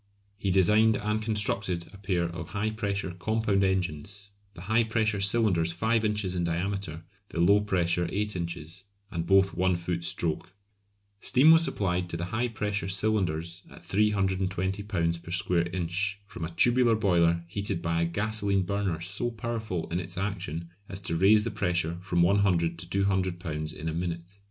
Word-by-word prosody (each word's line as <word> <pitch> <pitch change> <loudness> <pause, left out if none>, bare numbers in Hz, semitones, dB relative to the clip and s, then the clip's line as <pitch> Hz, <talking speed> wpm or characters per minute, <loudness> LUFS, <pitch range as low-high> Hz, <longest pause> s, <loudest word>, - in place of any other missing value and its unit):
He 100 - -1
designed 105 +4 +4
and 105 +1 -1
constructed 100 -5 +1
a - - -11
pair 95 -3 0
of 85 0 -5
high 110 +2 0
pressure 100 -3 -2
compound 100 +2 0
engines, 95 +2 -2 0.2
the 85 - -10
high 110 +5 +2
pressure 110 -2 0
cylinders 100 -6 +3
5 110 +6 +1
inches 105 -3 -1
in 90 -1 -1
diameter, 85 -1 -3 0.3
the - - -5
low 100 +4 +5
pressure 90 -3 0
8 105 0 -1
inches, 85 +1 -5 0.3
and 85 -1 -3
both 95 0 +4
1 95 0 +2
foot 85 0 -3
stroke. 85 +2 -3 0.6
Steam 135 +9 +5
was 165 0 +7
supplied 90 - 0
to 85 - -3
the 85 - -3
high 120 +3 +1
pressure 105 -3 -2
cylinders 95 -5 0
at - - -14
320 95 -2 0
lbs. 85 -5 -1
per 85 - -12
square 85 -1 +1
inch 95 +3 -2
from 85 -4 -6
a - - -5
tubular 120 +6 +3
boiler 85 -5 +2
heated 100 -1 -3
by 85 -1 0
a 85 - +2
gasolene 100 +1 0
burner 95 -3 -2
so 100 +7 -1
powerful 110 -6 -4
in 85 - 0
its 90 0 -6
action 90 -4 -4 0.2
as 95 - -5
to 85 -3 -1
raise 105 +5 +5
the 115 - -3
pressure 85 -4 -1
from 90 -2 +1
100 85 -3 +2
to 85 0 -9
200 95 -2 0
lbs. 75 -3 -4
in 80 +1 -7
a 80 - -1
minute. 85 +3 -5
95 Hz, 170 wpm, -28 LUFS, 85-105 Hz, 0.6 s, was